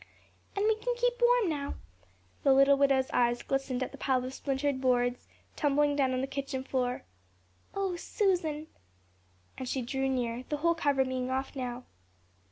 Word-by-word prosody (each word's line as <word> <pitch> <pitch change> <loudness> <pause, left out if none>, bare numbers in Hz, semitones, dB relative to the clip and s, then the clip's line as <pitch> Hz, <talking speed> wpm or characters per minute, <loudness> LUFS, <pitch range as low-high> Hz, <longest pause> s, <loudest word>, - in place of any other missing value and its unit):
"And 400 +1 +1
we 440 0 +4
can 485 +2 -2
keep - - +2
warm 485 -3 +5
now." 285 -3 -3 0.7
The 275 - +5
little 275 +1 +6
widow's 275 -1 +2
eyes 240 0 +2
glistened 270 -2 -1
at - - -5
the - - -11
pile 255 -2 +1
of 260 - -5
splintered 275 0 -1
boards 245 -1 +1 0.3
tumbling 290 0 +2
down 270 -2 +2
on 255 0 0
the - - 0
kitchen 270 -1 -4
floor. 250 -2 -1 0.7
"Oh, 390 -2 -1
Susan," 340 -6 0 0.9
and 260 -1 -4
she 260 - -1
drew 265 +2 -1
near, 245 -2 -1
the 295 - -1
whole 335 +3 +3
cover 285 -5 +2
being 255 -1 -2
off 265 +2 -2
now. 250 -1 -4
270 Hz, 170 wpm, -30 LUFS, 255-295 Hz, 0.9 s, little